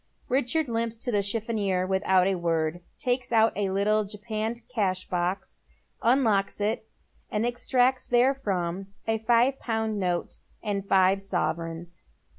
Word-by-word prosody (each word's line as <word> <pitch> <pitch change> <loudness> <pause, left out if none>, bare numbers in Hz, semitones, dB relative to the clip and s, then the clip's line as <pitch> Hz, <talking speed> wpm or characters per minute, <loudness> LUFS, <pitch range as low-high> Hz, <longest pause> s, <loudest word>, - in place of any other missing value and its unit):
Richard 270 +4 +1
limps 230 -1 -1
to 245 +2 -3
the 205 -2 +2
chiffonier 200 -3 0
without 190 -1 +3
a 195 - +2
word, 165 -1 -1 0.2
takes 245 0 -1
out 225 -1 +4
a 200 -1 0
little 210 +3 +2
japanned 215 +3 -4
cash 195 -7 -1
box, 180 +2 -2 0.4
unlocks 225 -6 +2
it, 215 +2 -1 0.4
and 210 +2 0
extracts 250 +1 +1
therefrom 200 -8 +1 0.2
a 225 0 +1
five 240 +4 +3
pound 220 -2 -1
note 180 -2 -1 0.3
and 200 -2 -2
five 190 +1 +4
sovereigns. 170 -2 -3
210 Hz, 130 wpm, -27 LUFS, 190-235 Hz, 0.4 s, out